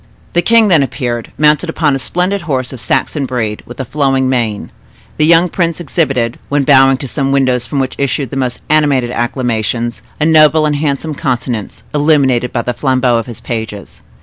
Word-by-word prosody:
The 175 - +3
king 225 +2 +4
then 165 -5 +5
appeared, 125 -3 -3
mounted 150 +3 +2
upon 155 -3 +1
a 135 - -1
splendid 180 +7 -1
horse 130 -2 -1
of 125 - -9
Saxon 140 +2 -1
breed, 115 -4 -3
with 120 - -11
a 130 - -3
flowing 135 -1 0
mane. 115 -5 -2 0.5
The 155 - +3
young 170 +1 +5
prince 170 -1 -1
exhibited, 135 -7 -1
when 145 0 +1
bowing 135 -1 +5
to 135 - -6
some 135 +1 -1
windows 130 -3 +1
from 145 - -4
which 130 -1 -1
issued 140 -1 -1
the - - -5
most 130 -2 -2
animated 145 -5 +2
acclamations, 120 -1 -2 0.2
a 150 - +1
noble 155 -1 +5
and 150 -1 0
handsome 150 +1 -2
countenance, 120 -5 -3
illuminated 140 -5 +2
by 120 - -2
the 125 - -2
flambeaux 130 -2 +1
of 115 - -6
his 120 - -9
pages. 110 -4 -6
135 Hz, 185 wpm, -14 LUFS, 120-150 Hz, 0.5 s, then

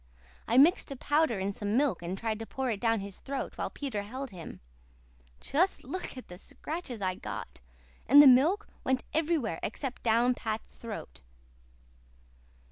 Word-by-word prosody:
I 235 - +2
mixed 320 +8 +5
a 275 - -5
powder 290 -3 +1
in 195 +1 -2
some 205 +3 -1
milk 270 -11 +2
and 175 +2 -4
tried 220 0 -2
to 225 - -6
pour 265 -2 -2
it 205 - -4
down 225 -3 +2
his 200 -1 -8
throat 275 -1 -4
while - - -3
Peter 265 -8 -4
held 255 +5 -6
him. 175 -4 -9 0.8
Just 340 +8 +1
look 370 -7 -5
at 255 - -9
the 180 0 -10
scratches 265 - -6
I 185 -1 +1
got! 180 - -7 0.5
And 280 +5 +8
the 290 - +11
milk 295 +11 +5 0.2
went 260 0 +1
everywhere 305 - 0
except 255 +4 -4
down 235 +2 +3
Pat's 220 -2 -5
throat." 220 - -8
245 Hz, 165 wpm, -30 LUFS, 210-280 Hz, 0.8 s, the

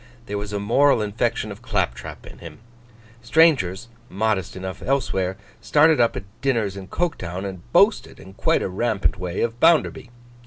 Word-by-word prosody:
There 105 -1 -4
was 100 0 -6
a 105 - -2
moral 120 +3 +3
infection 110 +1 -2
of 100 +3 -10
clap 105 - -1
trap - - -10
in - - -12
him. - - -10 0.6
Strangers, 120 - +3 0.2
modest 100 -1 -1
enough 95 0 -6
elsewhere, 95 -9 -1 0.2
started 155 -2 +4
up 115 - +2
at - - -5 0.2
dinners 115 -8 0
in 95 -1 -8
Coketown, 95 - -3
and 95 +4 -8
boasted, 205 - +3
in 95 - -13
quite - - +1
a - - -1
rampant 100 -1 -1
way, 90 0 -3
of 115 0 -2
Bounderby. 160 -6 +3
105 Hz, 165 wpm, -22 LUFS, 95-125 Hz, 0.6 s, started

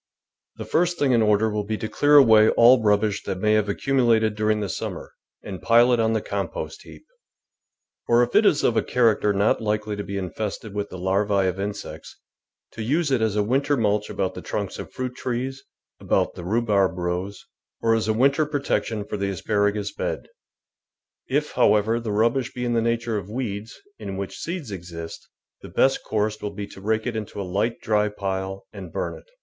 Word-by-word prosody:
The - - -7
first 175 +1 +1
thing 140 -2 +2
in 120 -2 +4
order 105 0 +3
will 105 -1 -2
be 110 +1 -3
to 110 - -4
clear 145 +6 +3
away 110 -6 +7
all 120 +1 +6
rubbish 105 0 +2
that 95 - -3
may 105 +1 +2
have 105 -1 +2
accumulated 115 -2 +2
during 105 0 +1
the 105 - -2
summer, 85 - -5 0.3
and 95 -3 -7
pile 120 +2 +5
it 120 - +2
on 110 0 +2
the 110 - -1
compost - - -4
heap, - - -14 1.0
or 120 +1 +5
if 120 - -3
it - - +6
is 155 -8 +3
of 120 - +2
a - - +3
character 115 -4 +2
not 100 +3 +2
likely 105 -1 -1
to 105 - -4
be 100 0 -5
infested 100 +2 -5
with 100 0 -3
the 90 - -8
larvi 95 +1 +1
of 95 +1 -2
insects, 100 -6 -6 0.5
to 115 - -7
use 145 +7 0
it 130 -4 +2
as 110 -2 +1
a 105 - +2
winter 140 +6 +1
mulch 105 -2 0
about 95 -1 -2
the - - -8
trunks - - -4
of - - -7
fruit 130 -1 -4
trees, 130 +2 -4 0.3
about - - 0
the - - -9
rhubarb 100 -2 +1
rows, 90 +3 -3 0.3
or 115 0 +2
as 110 -1 0
a 110 - +2
winter 140 +6 +3
protection 135 -7 -1
for 105 - -4
the 100 0 -1
asparagus 105 +2 0
bed. - - -4 1.0
If, - - 0
however, 105 +2 +3
the 115 -2 -4
rubbish 115 +4 +1
be 125 0 -4
in 120 - 0
the 115 - +2
nature 115 -1 0
of 100 0 -10
weeds, 110 -3 -5 0.2
in 95 - -6
which 100 0 -5
seeds 170 - -5
exist, 85 -3 -8 0.3
the - - -10
best 135 - +2
course 105 0 -1
will 100 -1 -5
be 100 - -4
to 95 - -12
rake 110 +2 0
it 125 -2 -3
into 105 -2 -5
a - - -2
light, 100 +6 -1
dry 105 -1 +1
pile 95 -1 -4
and 95 -5 -9
burn - - -3
it. - - -16
110 Hz, 200 wpm, -24 LUFS, 100-120 Hz, 1.0 s, away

